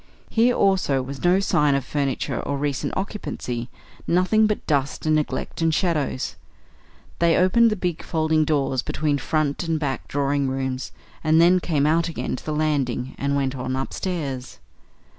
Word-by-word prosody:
Here 240 +2 +3
also 185 -9 +2
was 135 +1 -7
no 180 +2 +4
sign 150 -7 +2
of 135 -2 -1
furniture 140 -2 -1
or 140 - -2
recent 140 -1 -2
occupancy; 130 - -4 0.4
nothing 185 +5 +3
but 210 - -2
dust 140 -1 -1
and 155 - +3
neglect 155 +2 -2
and 165 0 +3
shadows. 155 -6 -1 0.8
They 170 -1 +4
opened 230 +6 +5
the 215 - 0
big 180 -4 -2
folding 155 -1 +1
doors 140 -4 +1
between 145 +1 -1
front 155 -2 0
and 165 -2 -1
back 140 -3 -3
drawing 140 0 0
rooms 130 0 -3 0.3
and 160 0 +4
then 175 +2 +6
came 155 -5 0
out 165 +2 +2
again 165 - -3
to - - -9
the 155 - -4
landing 140 -5 -1
and 140 0 0
went 135 -1 0
on 130 0 -3
upstairs. 135 -2 -4
150 Hz, 160 wpm, -23 LUFS, 135-170 Hz, 0.8 s, then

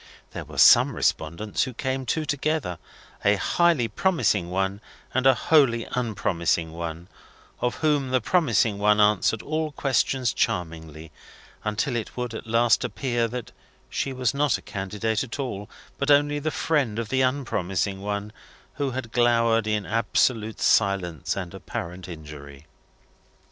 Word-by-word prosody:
There - - -6
were - - -11
some - - +7
respondents 85 +7 -1
who 125 - -8
came 130 0 -3
two 160 -1 0
together, 145 - -1 0.4
a 100 +1 +4
highly 165 - +2
promising 120 - +1
one 95 +2 -1 0.3
and 130 +1 +2
a 135 - +6
wholly 125 -6 +3
unpromising 85 -8 -1
one: 85 +1 -6 0.5
of 125 - -1
whom 145 -4 +2
the 130 0 +2
promising 115 - +2
one 105 +1 +3
answered 105 +1 +3
all 155 0 -2
questions 130 -3 +1
charmingly, 80 -2 -3 0.5
until 105 +3 -1
it 115 0 -4
would 125 -2 -3
at 110 - -7
last 115 0 +3
appear 120 -3 -1
that 125 +1 -6 0.4
she 135 - -2
was 130 -2 0
not 140 -1 +2
a - - -15
candidate 105 +3 -2
at 125 - -7
all, 105 -8 -5 0.3
but 140 - -1
only 145 0 +4
the 155 +2 -1
friend 145 -9 0
of 115 -2 -3
the 130 +2 +1
unpromising 100 -8 -1
one, 105 +1 -3 0.5
who 140 -1 0
had 125 -3 -5
glowered 115 -2 +3
in 105 -2 0
absolute 110 +1 0
silence 95 -7 +1
and 90 -3 -5
apparent 90 -1 -6
injury. 75 -3 -10
115 Hz, 145 wpm, -25 LUFS, 95-130 Hz, 0.5 s, some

